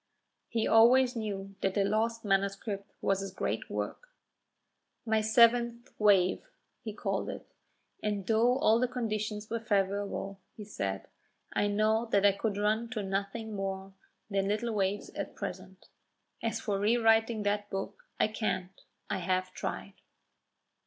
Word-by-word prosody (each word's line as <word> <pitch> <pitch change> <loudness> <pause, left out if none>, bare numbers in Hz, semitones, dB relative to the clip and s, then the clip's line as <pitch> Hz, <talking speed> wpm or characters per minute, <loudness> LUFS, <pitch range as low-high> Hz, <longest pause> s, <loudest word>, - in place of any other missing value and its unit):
He 225 -1 0
always 245 +3 +6
knew 200 -3 -4
that 190 -1 0
the 200 - +3
lost 225 +3 0
manuscript 200 +1 -1
was 195 0 +1
his 195 0 -4
great - - -3
work. - - -4 1.0
"My 220 -1 +2
seventh 235 +2 +4
wave," 195 -4 +4 0.4
he - - -4
called - - -2
it; - - -6 0.6
"and 205 -2 -2
though 235 +4 +3
all 230 -5 +4
the 250 - +2
conditions 215 -3 -3
were 230 - 0
favourable," 200 -2 -1 0.2
he 215 - -7
said, 95 - -4 0.5
"I 205 - +2
know 215 +3 +2
that 205 -2 +3
I 200 - +7
could 200 +1 -2
run 215 +3 +1
to 215 -4 -2
nothing 200 +3 -3
more 195 -1 -4 0.3
than 195 -1 0
little 220 +3 -1
waves 200 0 -1
at - - -5
present. - - -7 0.6
As 230 -1 -1
for 205 -3 -1
rewriting 225 0 +3
that 205 0 0
book, 195 0 -5 0.2
I - - +4
can't; 215 -4 -2 0.4
I - - -2
have 185 +1 -1
tried." - - -5
210 Hz, 145 wpm, -31 LUFS, 195-225 Hz, 1.0 s, I